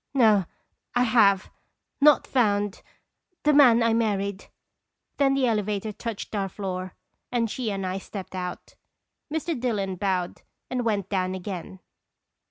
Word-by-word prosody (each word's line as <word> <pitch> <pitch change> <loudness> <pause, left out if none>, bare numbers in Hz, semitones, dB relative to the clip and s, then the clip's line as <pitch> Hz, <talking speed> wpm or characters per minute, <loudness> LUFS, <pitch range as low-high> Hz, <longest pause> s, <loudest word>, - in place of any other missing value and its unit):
No 215 -7 +5 0.5
I 245 - +4
have 210 -5 +4 0.5
not 300 0 +6
found 205 -5 +1 0.6
the 300 - +4
man 245 -5 +6
I 230 -1 +3
married." 200 -3 -1 0.7
Then 275 -1 +3
the 270 -1 +2
elevator 215 -2 -1
touched 225 +1 -6
our 195 -2 -1
floor, 185 -1 -5 0.4
and 230 -3 0
she 245 -4 -2
and 195 -2 -3
I 185 +1 -2
stepped 190 -1 -8
out. 180 -1 -6 0.6
Mr. 320 +2 -1
Dillon 200 -6 -1
bowed 185 -2 -1 0.3
and 250 -1 -1
went 205 -4 0
down 185 -1 -1
again. 185 0 -7
205 Hz, 135 wpm, -26 LUFS, 190-235 Hz, 0.7 s, not